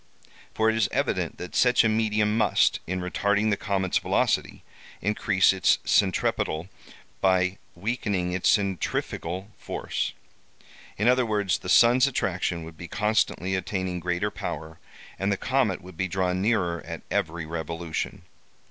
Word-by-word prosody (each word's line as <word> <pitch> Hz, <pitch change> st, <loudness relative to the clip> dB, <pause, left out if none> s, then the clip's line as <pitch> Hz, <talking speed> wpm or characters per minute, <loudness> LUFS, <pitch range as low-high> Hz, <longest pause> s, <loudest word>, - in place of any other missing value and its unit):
For 110 Hz, -, +2 dB
it 110 Hz, -, +3 dB
is 110 Hz, -2 st, +2 dB
evident -, -, -1 dB
that 90 Hz, -, -8 dB
such 125 Hz, -1 st, +5 dB
a -, -, +3 dB
medium 110 Hz, -1 st, +1 dB
must, 110 Hz, -, +3 dB
in 90 Hz, +1 st, -2 dB
retarding 100 Hz, +4 st, +1 dB
the -, -, +3 dB
comet's 95 Hz, -2 st, 0 dB
velocity, -, -, 0 dB, 0.4 s
increase 100 Hz, -1 st, +2 dB
its 95 Hz, -2 st, +3 dB
centripetal, 90 Hz, -3 st, +1 dB, 0.5 s
by 95 Hz, 0 st, +2 dB, 0.2 s
weakening 100 Hz, -2 st, -1 dB
its 90 Hz, 0 st, +1 dB
centrifugal 95 Hz, 0 st, -1 dB
force. -, -, -3 dB, 0.8 s
In 105 Hz, -, +1 dB
other 125 Hz, +1 st, +5 dB
words, 105 Hz, -3 st, 0 dB
the 90 Hz, -, -7 dB
sun's 120 Hz, +6 st, +6 dB
attraction 95 Hz, -8 st, -1 dB
would 80 Hz, 0 st, -11 dB
be 90 Hz, -, -8 dB
constantly 105 Hz, -1 st, 0 dB
attaining 95 Hz, -1 st, -2 dB
greater 90 Hz, +4 st, -1 dB
power, 80 Hz, +2 st, -6 dB, 0.4 s
and 95 Hz, +2 st, 0 dB
the 100 Hz, -, +1 dB
comet 125 Hz, -8 st, 0 dB
would 90 Hz, -2 st, -12 dB
be 95 Hz, -, 0 dB
drawn 90 Hz, 0 st, -1 dB
nearer 90 Hz, -6 st, +1 dB
at -, -, -7 dB
every 80 Hz, 0 st, -1 dB
revolution. 80 Hz, 0 st, -4 dB
95 Hz, 140 wpm, -26 LUFS, 90-105 Hz, 0.8 s, sun's